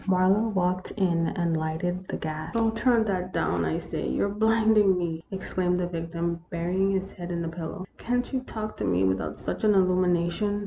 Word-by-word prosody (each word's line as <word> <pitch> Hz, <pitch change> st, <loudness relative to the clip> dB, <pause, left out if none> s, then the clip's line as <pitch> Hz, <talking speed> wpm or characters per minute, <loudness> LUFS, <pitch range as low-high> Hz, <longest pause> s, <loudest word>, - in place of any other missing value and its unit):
Marlowe 190 Hz, +4 st, +4 dB
walked 185 Hz, -2 st, 0 dB
in 170 Hz, -4 st, +2 dB
and 170 Hz, -2 st, 0 dB
lighted 170 Hz, +4 st, -2 dB
the -, -, -3 dB
gas. 155 Hz, +1 st, -5 dB
" -, -, -11 dB
Oh, 225 Hz, -1 st, +3 dB
turn 230 Hz, 0 st, +3 dB
that 185 Hz, -3 st, -2 dB
down, 85 Hz, -1 st, +1 dB
I 80 Hz, -1 st, 0 dB
say; -, -, -4 dB
you 65 Hz, -, +1 dB
're -, -, -1 dB
blinding 215 Hz, -2 st, +4 dB
me! 165 Hz, -2 st, -3 dB
" -, -, -38 dB
exclaimed 185 Hz, -1 st, -1 dB
the 180 Hz, -, 0 dB
victim, 170 Hz, 0 st, -3 dB
burying 180 Hz, +3 st, 0 dB
his 195 Hz, 0 st, -1 dB
head 175 Hz, -1 st, -7 dB
in 170 Hz, -1 st, -2 dB
the -, -, -2 dB
pillow. 170 Hz, +3 st, -5 dB
"Can't 245 Hz, +2 st, -1 dB
you 260 Hz, -, +2 dB
talk 215 Hz, -4 st, -6 dB
to -, -, -3 dB
me 90 Hz, +1 st, +2 dB
without 95 Hz, 0 st, 0 dB
such -, -, -4 dB
an 210 Hz, -1 st, +5 dB
illumination 185 Hz, +2 st, +2 dB
180 Hz, 210 wpm, -27 LUFS, 170-205 Hz, -, an